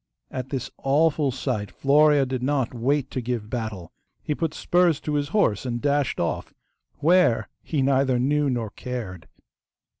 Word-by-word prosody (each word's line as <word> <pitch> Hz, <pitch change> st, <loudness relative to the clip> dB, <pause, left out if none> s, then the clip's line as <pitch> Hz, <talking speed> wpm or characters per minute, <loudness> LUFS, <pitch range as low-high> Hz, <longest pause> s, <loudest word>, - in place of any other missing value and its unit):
At 130 Hz, 0 st, -5 dB
this 130 Hz, -3 st, -4 dB
awful 145 Hz, +1 st, +2 dB
sight 120 Hz, -5 st, -3 dB
Florea 145 Hz, 0 st, +4 dB
did 130 Hz, -1 st, -3 dB
not 135 Hz, -2 st, 0 dB
wait 135 Hz, +3 st, 0 dB
to 130 Hz, -, -3 dB
give 115 Hz, -3 st, -4 dB
battle. 110 Hz, -8 st, -4 dB, 0.3 s
He 150 Hz, -, -1 dB
put 160 Hz, 0 st, -2 dB
spurs 175 Hz, -4 st, +2 dB
to 150 Hz, -, -3 dB
his 145 Hz, -1 st, 0 dB
horse 165 Hz, -, +1 dB
and 120 Hz, -2 st, -3 dB
dashed 145 Hz, 0 st, 0 dB
off, 85 Hz, -, -3 dB, 0.5 s
WHERE 155 Hz, -, +4 dB
he 145 Hz, -4 st, -1 dB
neither 135 Hz, -1 st, +2 dB
knew 145 Hz, +3 st, +1 dB
nor 115 Hz, -5 st, -2 dB
cared. 110 Hz, -10 st, -6 dB
135 Hz, 155 wpm, -24 LUFS, 120-145 Hz, 0.5 s, Florea